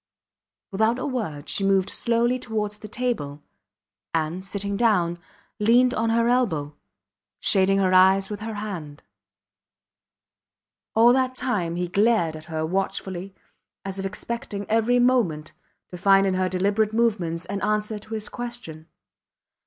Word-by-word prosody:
Without 220 +4 +2
a 255 - -3
word 205 - -4
she 200 - 0
moved 195 0 +2
slowly 235 +2 +1
towards 210 -3 -3
the 215 - -9
table, 205 - -3 0.7
and, 165 +3 -1
sitting 200 +1 -3
down, 180 -6 +2 0.4
leaned 245 +4 +4
on 225 +1 0
her 230 +1 +2
elbow, 165 - 0 0.6
shading 195 0 +3
her 190 -1 +2
eyes 190 +1 +5
with 210 -1 -6
her 220 0 -5
hand. 175 -9 -6 1.9
All 235 +2 +6
that 255 0 +1
time 205 -11 -1
he 180 0 -2
glared 200 -3 +2
at 155 0 -10
her 160 -1 -3
watchfully 190 +1 -3 0.5
as 195 0 -4
if 195 - -3
expecting 210 0 -5
every 225 +3 +2
moment 235 -12 +2 0.4
to 180 - -9
find 195 +1 +5
in 190 - +1
her 185 0 0
deliberate 200 +4 +1
movements 185 -8 0
an 200 +2 -4
answer 210 0 -1
to 220 +2 -7
his 215 -1 -4
question. 235 -11 -8
200 Hz, 140 wpm, -24 LUFS, 180-230 Hz, 1.9 s, All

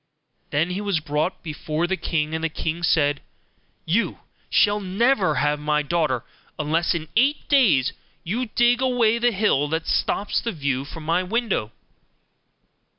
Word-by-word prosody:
Then 160 +5 0
he 190 +3 -3
was 200 -5 0
brought 155 +3 -2
before 155 0 -2
the 190 +2 0
king, 155 -4 -2
and 160 0 -3
the 165 - +1
king 160 +2 -3
said, 145 -4 +2 0.6
'You 200 +9 0 0.3
shall 205 0 +3
never 205 +2 +1
have 145 +3 +1
my 150 0 0
daughter 150 -6 0 0.3
unless 160 +3 0
in 160 -1 -4
eight 275 +6 +2
days 215 - +4 0.3
you 235 +9 -2
dig 240 +3 +2
away 240 -3 +2
the 240 +1 +3
hill 190 -9 +1
that 160 +1 -2
stops 205 - 0
the 230 - -3
view 140 -4 -2
from 155 +2 -9
my 165 +3 +1
window. 195 - -1
170 Hz, 155 wpm, -23 LUFS, 150-215 Hz, 0.6 s, days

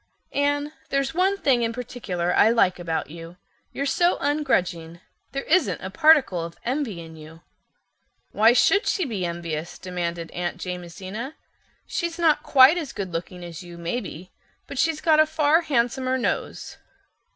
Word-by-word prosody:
"Anne, 290 +1 0 0.2
there's 275 +1 0
one 380 +3 +2
thing 265 -9 +2
in 230 -1 0
particular 215 -8 -3
I 215 - +6
like 190 -6 +2
about 165 -4 -3
you—you're 170 - -9
so 350 +5 +2
ungrudging. 180 - -1 0.3
There 275 - -3
isn't 365 +4 +2
a - - -7
particle 300 - +4
of 170 0 -8
envy 250 - -2
in 165 -1 -10
you." 160 +1 -13 0.9
"Why 220 +2 +5
should 395 - +3
she 370 - +1
be 200 -9 -2
envious?" 170 -1 -5
demanded 170 -2 -4
Aunt 175 0 -3
Jamesina. 185 - -6 0.5
"She's 340 -2 -3
not 325 -3 +3
quite 275 +5 +6
as 300 -7 -6
goodlooking 180 -1 -5
as 170 -1 -8
you, 175 -1 -11
maybe, 180 0 -5 0.3
but - - -7
she's 320 -1 +1
got 310 -2 +4
a 310 - +6
far 315 +1 +3
handsomer 260 -3 0
nose." 250 - -3
230 Hz, 150 wpm, -24 LUFS, -, 0.9 s, I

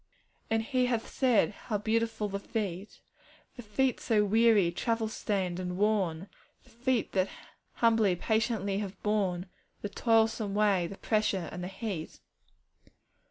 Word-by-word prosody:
'And 225 0 +1
He 255 +1 +1
hath 235 -2 -1
said, 250 -6 +3
"How 215 - 0
beautiful 220 0 0
the 200 0 -4
feet!" 200 -2 -4 0.5
The 245 - -8
"feet" 245 +4 0
so 210 -2 +2
weary, 215 -4 +4
travel 225 +5 -1
stained, 190 -5 -2
and 180 -1 -4
worn 195 -4 +1 0.4
The - - -22
"feet" 245 0 0
that 190 0 +1 0.4
humbly, 225 -5 +3
patiently 215 -1 0
have 195 -2 -5
borne 195 -4 0 0.4
The 205 - -2
toilsome 225 -2 +2
way, 200 -4 +3
the 195 - -9
pressure, 210 -5 0
and 180 +1 -6
the - - -3
heat. 190 -4 -5
210 Hz, 140 wpm, -30 LUFS, 195-225 Hz, 0.5 s, weary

